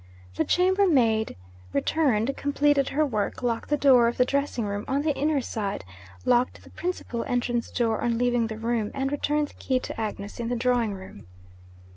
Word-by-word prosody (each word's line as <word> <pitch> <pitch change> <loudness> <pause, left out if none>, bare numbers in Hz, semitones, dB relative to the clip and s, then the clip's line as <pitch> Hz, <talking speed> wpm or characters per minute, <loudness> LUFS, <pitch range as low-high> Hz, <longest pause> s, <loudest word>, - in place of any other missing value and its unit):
The - - +1
chambermaid 335 - +3 0.4
returned, 260 - +1
completed 285 -1 +2
her 305 +2 +2
work, 215 -2 -2
locked 230 -2 -1
the 295 - +2
door 255 -5 +6
of 235 - -2
the 250 - +4
dressing 280 -4 -1
room 205 0 -3
on 280 +2 0
the 300 -2 +1
inner 295 0 +1
side, 205 - -4 0.4
locked 245 +1 +2
the - - -16
principal 345 -10 -3
entrance 240 -1 -1
door 225 -2 0
on 235 -1 +1
leaving 245 -1 +2
the 220 -1 -6
room, 225 -1 -1
and 270 0 -1
returned 295 0 0
the - - -17
key 260 -1 -1
to - - -5
Agnes 205 -1 -5
in 235 -1 -2
the 245 - 0
drawing 240 -3 +1
room. 190 - -11
245 Hz, 180 wpm, -26 LUFS, 225-280 Hz, 0.4 s, door